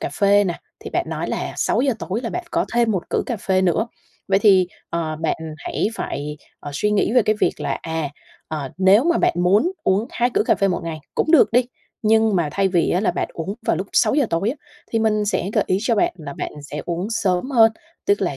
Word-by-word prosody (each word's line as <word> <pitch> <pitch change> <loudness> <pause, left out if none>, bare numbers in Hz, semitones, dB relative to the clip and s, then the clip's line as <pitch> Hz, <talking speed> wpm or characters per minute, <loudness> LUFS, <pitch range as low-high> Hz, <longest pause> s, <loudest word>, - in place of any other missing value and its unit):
cà - - -2
phê 205 +3 +4
nè, 175 -3 -3 0.2
thì - - -8
bạn - - 0
nói - - -3
là - - -3
6:00 265 0 +1
tối 200 +5 -3
là 230 - -3
bạn 360 - -4
có - - +1
thêm 235 -1 +3
một 190 -5 -3
cữ - - +1
cà 240 - -2
phê 190 -1 +1
nữa, 185 +5 +2 0.4
vậy 195 - +4
thì, 195 -3 +5 0.2
ờ, 160 -2 -2
bạn 160 0 -1 0.2
hãy 175 - -2
phải, 150 -7 -4 0.2
ờ, 145 - -7
suy 210 +8 0
nghĩ 210 +1 +1
về 250 -3 +5
cái 215 - +2
việc - - +1
là, - - -2
à, 160 -3 -3 0.4
ờ, 145 -4 -4
nếu 195 +7 +5
mà 340 0 +2
bạn - - +2
muốn 200 - +3
uống 200 +5 +2
2 245 +1 0
cữ - - +2
cà - - +3
phê 195 - +1
một 180 - -1
ngày 160 -2 -4 0.2
cũng 315 - 0
được 320 -8 +6
đi, 245 +2 +4 0.4
nhưng 220 -2 +3
mà 165 -4 +1
thay 195 +2 +2
vì 175 -2 +1
á, 180 - +2
là 210 - +2
bạn - - -2
uống 185 +5 -4
vào - - +2
lúc 190 +4 -3
6:00 280 -2 +3
tối 180 +7 +1
á, 285 - -6 0.4
thì 225 - +2
mình 215 -1 +1
sẽ 200 -2 -1
gợi 215 - +2
ý 185 - +1
cho 230 +1 +1
bạn 205 - +2
là 150 -4 -7
bạn - - -4
sẽ 150 +1 -6
uống 175 +3 -2
sớm 200 +2 0
hơn. 225 -4 +5 0.3
Tức 205 - +3
là 145 -7 -1
195 Hz, 245 wpm, -21 LUFS, 175-225 Hz, 0.4 s, được